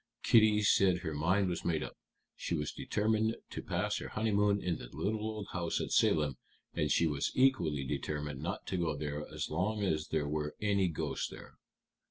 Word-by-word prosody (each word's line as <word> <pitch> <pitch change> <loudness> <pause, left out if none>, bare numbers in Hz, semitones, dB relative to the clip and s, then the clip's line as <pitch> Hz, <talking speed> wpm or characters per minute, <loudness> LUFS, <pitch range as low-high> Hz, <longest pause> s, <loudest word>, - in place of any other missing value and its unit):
Kitty 110 -2 +5
said 95 -3 +4
her 80 - -2
mind 90 +7 +2
was 90 - -2
made 80 -3 0
up. - - -7 0.4
She 85 - -2
was 75 -1 -2
determined 110 +1 0 0.2
to - - -4
pass - - -1
her - - -6
honeymoon 105 -2 +2
in 90 -3 -2
the - - -8
little 105 +2 -2
old 110 -2 -4
house 85 -2 -1
at - - -3
Salem, 75 -5 +3 0.4
and 75 - 0
she 85 - +4
was 75 -3 0
equally 85 - +3
determined 75 0 -3
not 85 - -4
to 95 - -2
go 80 -4 0
there 75 0 -4
as - - -4
long 105 +6 0
as 75 -5 0
there 75 -2 0
were 75 0 -2
any 100 -3 +2
ghosts 80 - -2
there. - - -12
85 Hz, 190 wpm, -33 LUFS, 75-105 Hz, 0.4 s, Kitty